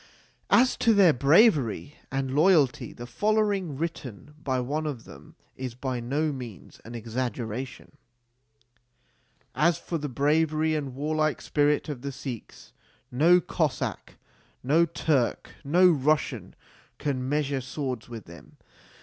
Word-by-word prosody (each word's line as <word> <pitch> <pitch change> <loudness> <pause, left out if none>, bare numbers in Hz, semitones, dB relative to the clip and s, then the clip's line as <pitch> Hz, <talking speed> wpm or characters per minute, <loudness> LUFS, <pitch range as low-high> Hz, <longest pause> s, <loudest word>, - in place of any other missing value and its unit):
As 255 +1 +4
to 230 -2 +3
their 185 -6 +6
bravery 145 - +3 0.2
and 135 0 -2
loyalty, 150 -3 +3
the 120 - -9
following, 205 - 0
written 145 -4 -6
by 130 -2 0
one 150 +5 -2
of 130 -6 -5
them, 70 +2 -14 0.2
is 130 -2 -6
by 130 -1 -3
no 145 +6 -1
means 125 -8 -9
an 115 +1 -9
exaggeration: 120 +1 -5 1.6
As 165 0 +2
for 165 - -4
the 145 0 -4
bravery 155 +3 +1
and 140 -4 -3
warlike 155 +2 0
spirit 145 0 +1
of 145 -5 -5
the 140 +1 -4
Sikhs, 130 -4 -9 0.4
no 165 +8 +5
Cossack, 160 -5 -2 0.5
no 160 +6 +3
Turk, 150 -6 0
no 175 +6 +5
Russian, 150 0 0 0.4
can 130 -3 -2
measure 145 -2 0
swords 130 -2 -5
with 115 -3 -8
them. 85 0 -14
145 Hz, 125 wpm, -27 LUFS, 125-155 Hz, 1.6 s, their